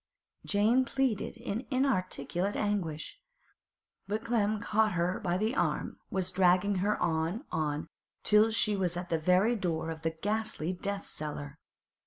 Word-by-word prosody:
Jane 220 +5 +3
pleaded 260 -5 -1
in 230 +1 -4
inarticulate 200 - 0
anguish. 195 - -2 0.9
But 215 +3 -2
Clem 215 -3 +2
had 215 - -4
caught 215 0 +2
her 175 +1 0
by 175 -1 0
the 220 +6 0
arm, - - -1
was 185 -1 -1
dragging 185 +2 +3
her 205 +3 +1
on, 165 - 0
on, 150 -1 -1 0.4
till 210 +1 +5
she 220 -2 +2
was 180 -3 0
at 180 0 -5
the 165 - +1
very 185 +8 +3
door 165 -5 -2
of 160 0 -7
that 160 0 -4
ghastly 210 -5 -1
death 200 +2 -4
cellar. 145 -1 -5
195 Hz, 150 wpm, -31 LUFS, 170-215 Hz, 0.9 s, till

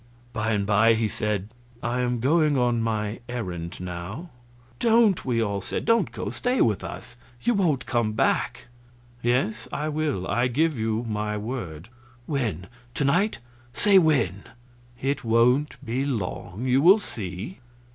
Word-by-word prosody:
By 110 -1 0
and 100 -1 0
by 105 +2 +4
he 110 0 +1
said: 105 -1 -2 0.3
"I 120 +2 -1
am 125 -1 -1
going 150 +2 +3
on 120 -2 +2
my 110 -1 -2
errand 90 -8 -5
now." 90 - -6 0.5
"Don't!" 225 -4 +4
we 120 -3 +1
all 100 -2 -2
said. - - -4
"Don't 230 -3 +3
go; - - -4
stay 250 +1 0
with 105 -4 +2
us. 120 - -8 0.3
You 240 - +3
won't 165 - +1
come 120 -4 0
back." 110 - 0 0.6
"Yes, 120 -2 0
I 150 +1 -2
will; 150 -11 -1
I 120 +4 +1
give 155 +5 +1
you 110 0 -1
my 105 -1 -2
word." 105 -7 -5 0.4
"When? 115 - -2 0.3
To 145 - 0
night? 180 +10 +2 0.4
Say 200 +4 +5
when." 135 - +1 0.5
"It 140 +1 -1
won't 120 +5 +3
be 125 +3 -1
long. 110 -3 -3
You 130 +1 +3
will 185 +7 +8
see." 100 - -6
120 Hz, 150 wpm, -25 LUFS, 105-145 Hz, 0.6 s, will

